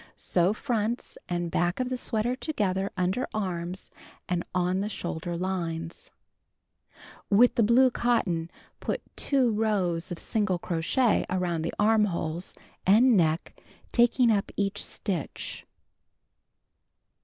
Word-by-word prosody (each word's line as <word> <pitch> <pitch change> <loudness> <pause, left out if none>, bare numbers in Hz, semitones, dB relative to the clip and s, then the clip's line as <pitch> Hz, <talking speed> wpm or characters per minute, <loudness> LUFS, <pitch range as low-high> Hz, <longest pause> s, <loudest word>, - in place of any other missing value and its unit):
Sew 180 +1 +2
fronts 230 0 -2
and 175 -1 -2
back 175 +5 0
of 255 -1 -1
the 255 - -1
sweater 240 0 -1
together 200 - -1
under 185 +7 0
arms 180 -3 -3 0.4
and 175 -1 -1
on 180 +1 +1
the 205 - -2
shoulder 175 -3 -4
hnes. 170 -3 -3 1.2
With 230 +5 +6
the - - +2
blue 245 +4 +5
cotton, 185 -10 0 0.3
put - - -3
2 265 -4 +2
rows 195 -7 0
of 175 - -3
single 205 -3 0
crochet 175 +9 +1
around 180 -3 -1
the 165 - -3
armholes 195 -6 +1 0.3
and 230 +6 +6
neck 165 -2 0 0.3
taking 240 0 +4
up 200 -2 0
each 200 -1 -1
stitch. 180 -7 -4
190 Hz, 120 wpm, -27 LUFS, 175-225 Hz, 1.2 s, With